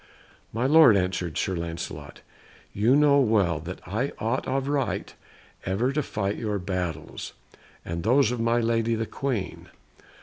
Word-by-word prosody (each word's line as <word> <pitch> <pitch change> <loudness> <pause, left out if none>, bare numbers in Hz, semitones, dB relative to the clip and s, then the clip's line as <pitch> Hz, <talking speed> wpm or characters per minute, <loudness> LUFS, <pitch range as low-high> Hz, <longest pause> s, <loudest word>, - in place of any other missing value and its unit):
"My 115 +3 -1
lord," 150 -6 +7
answered 90 -4 -2
Sir 95 - -1
Lancelot, 80 -4 -6 0.5
"you 115 +6 +3
know 145 -1 +5
well 100 - +2
that 85 +4 -9
I 110 +9 -1
ought 115 +5 -2
of 135 +1 -1
right 140 -3 -1 0.5
ever 110 +8 0
to 150 +2 0
fight 105 -6 -3
your 105 -2 -2
battles, 90 -4 -4 0.5
and 85 0 -4
those 120 +4 +3
of 125 - -3
my 115 +1 +2
lady 115 0 +1
the 115 0 -2
Queen. 125 -5 -4
110 Hz, 145 wpm, -26 LUFS, 90-130 Hz, 0.5 s, lord